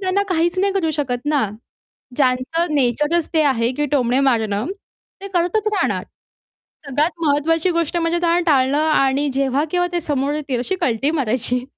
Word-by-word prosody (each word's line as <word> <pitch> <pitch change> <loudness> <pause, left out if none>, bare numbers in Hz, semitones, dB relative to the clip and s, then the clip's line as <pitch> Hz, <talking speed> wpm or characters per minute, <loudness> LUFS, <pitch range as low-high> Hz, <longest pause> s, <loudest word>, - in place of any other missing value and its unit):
त्यांना 380 +1 +1
काहीच 345 +1 0
नाही 395 +1 +2
करू 365 -5 0
शकत 250 -2 -3
ना. 290 -8 +1 0.7
ज्यांचं 290 +5 0
नेचरच 295 +5 +1
ते 315 - +4
आहे, 245 -4 +1
की 295 +3 -1
टोमणे 255 -1 +2
मारणं, 220 -2 -1 0.5
ते 395 - -7
करतच 360 +5 +1
राहणार. - - 0 0.8
सगळ्यात 290 +4 +1 0.2
महत्त्वाची 320 +4 +2
गोष्ट 335 -1 -1
म्हणजे 335 0 +1
त्यांना 345 0 +2
टाळणं 270 0 +3
आणि 275 0 +2
जेव्हा 275 +1 +1
केव्हा 355 +1 +1
ते 345 - 0
समोर 290 -2 -1
येतील 285 -4 -3
अशी 375 +10 -2
कल्टी 250 +4 +1
मारायची. 250 -4 -1
295 Hz, 160 wpm, -20 LUFS, 260-340 Hz, 0.8 s, ते